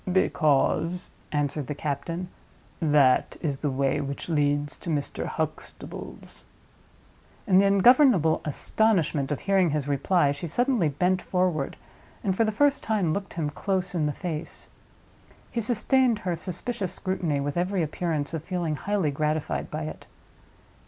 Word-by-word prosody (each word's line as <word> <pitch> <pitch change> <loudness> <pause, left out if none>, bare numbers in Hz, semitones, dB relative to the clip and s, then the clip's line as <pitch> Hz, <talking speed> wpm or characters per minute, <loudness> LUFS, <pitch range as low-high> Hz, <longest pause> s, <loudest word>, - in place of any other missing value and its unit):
"Because," 170 0 +1 0.2
answered 145 -1 -1
the 150 - -3
captain, 165 +5 -3 0.5
"that 145 -5 +3
is 145 -5 -2
the 150 - -1
way 135 +2 0
which 140 +4 -5
leads 145 -2 +1
to - - -6
Mr. 145 -3 -2
Huxtable's." 155 -1 -6 1.0
In 190 -2 +5
the 200 - +5
ungovernable 200 - +5
astonishment 160 -3 +1
of 145 - -2
hearing 195 -3 +3
his 145 -2 -1
reply 145 +2 +2
she 145 +4 -5
suddenly 240 - +1
bent 180 +5 +1
forward, 180 -6 -1 0.5
and 190 -3 +1
for 225 - +3
the 215 - +1
first 285 +6 +2
time 200 -8 0
looked 200 +2 -4
him 155 -3 -1
close 190 +4 -2
in 160 -4 +1
the - - 0
face. 160 0 -5 0.8
He 235 - -1
sustained 240 +1 +3
her 180 -2 0
suspicious 185 +4 -4
scrutiny 180 -6 -1
with 140 +1 -2
every 180 +1 0
appearance 155 -1 -2
of 160 -2 -3
feeling 170 -5 -2
highly 195 -6 0
gratified 150 +1 -1
by 155 +1 -4
it. 155 - -7
165 Hz, 145 wpm, -26 LUFS, 145-190 Hz, 1.0 s, In